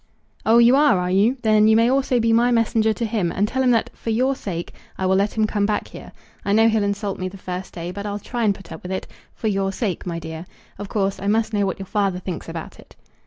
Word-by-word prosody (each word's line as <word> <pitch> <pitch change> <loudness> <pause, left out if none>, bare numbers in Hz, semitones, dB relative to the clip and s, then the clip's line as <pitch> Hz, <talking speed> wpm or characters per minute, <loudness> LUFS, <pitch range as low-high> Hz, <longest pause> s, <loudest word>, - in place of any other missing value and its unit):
"Oh, 225 +1 +6
you 235 +2 +6
are, 285 -8 +4
are 180 0 -1
you? 210 +8 +3
Then 215 -1 +4
you 220 - +5
may 230 +1 +4
also 260 -1 +2
be 230 0 +2
my 235 +2 +4
messenger 225 -2 +2
to 230 +2 -2
him, 210 -6 -1
and 205 +4 0
tell 260 +4 -1
him 255 - +3
that, 230 -2 +2
for - - -7
your 255 +5 +1
sake, 175 -8 -5 0.2
I 190 - -2
will 190 0 +3
let 200 +3 0
him 215 - +3
come 205 -1 0
back 210 - -2
here. - - -11 0.3
I 200 - 0
know 225 +1 +5
he'll 220 -1 +1
insult 200 0 -2
me 185 0 -2
the 195 - -11
first 185 0 -6
day; 170 0 -5
but 200 +2 -6
I'll 205 0 -3
try 235 +3 -4
and 205 -2 +2
put 195 - -14
up 160 - -8
with 180 - -7
it, 190 - -3 0.3
for 220 - -3
your 195 -2 0
sake, 195 -3 -3
my 170 -1 -3
dear. 160 +1 -7 0.3
Of 205 -1 -6
course 195 -2 -1
I 200 - -4
must 220 +1 +1
know 205 -1 +1
what 190 - -3
your 195 - -7
father 195 -1 0
thinks 180 -2 -6
about 165 -1 -7
it." - - -17
205 Hz, 270 wpm, -22 LUFS, 190-225 Hz, 0.3 s, Oh